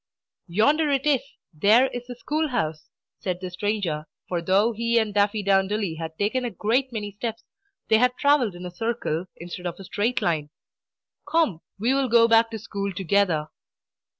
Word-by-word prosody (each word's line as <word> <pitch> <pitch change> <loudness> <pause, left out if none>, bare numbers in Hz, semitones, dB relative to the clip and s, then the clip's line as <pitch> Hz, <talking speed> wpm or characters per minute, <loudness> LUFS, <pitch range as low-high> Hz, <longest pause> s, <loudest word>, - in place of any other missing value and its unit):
"Yonder 290 - +3
it 275 -1 +1
is, 285 -4 +3 0.3
there 210 +11 +5
is 245 0 -7
the 245 - -7
school 310 +6 -1
house!" 160 - -3 0.3
said 180 -2 -3
the 185 -1 -6
stranger, 180 -6 -2 0.2
for 175 -2 -2
though 195 +6 +3
he 235 +1 0
and 220 -2 +1
Daffydowndilly 200 -2 +1
had 160 -1 -6
taken 220 +5 0
a 245 - -1
great 235 +6 0
many 210 -3 -4
steps, 225 +2 -5 0.4
they 220 - +5
had 250 +1 +3
travelled 285 -9 +3
in 175 +1 -8
a 180 - -6
circle 185 -4 -2
instead 175 +1 -7
of 175 +1 -6
a - - -8
straight 215 +6 -1
line. 155 -4 -1 0.8
"Come; 300 - +2 0.2
we 230 +6 +1
will 270 -2 +1
go 230 0 +6
back 225 0 +5
to 225 - -5
school 200 -2 -4
together." 180 -4 +1
210 Hz, 175 wpm, -25 LUFS, 180-240 Hz, 0.8 s, go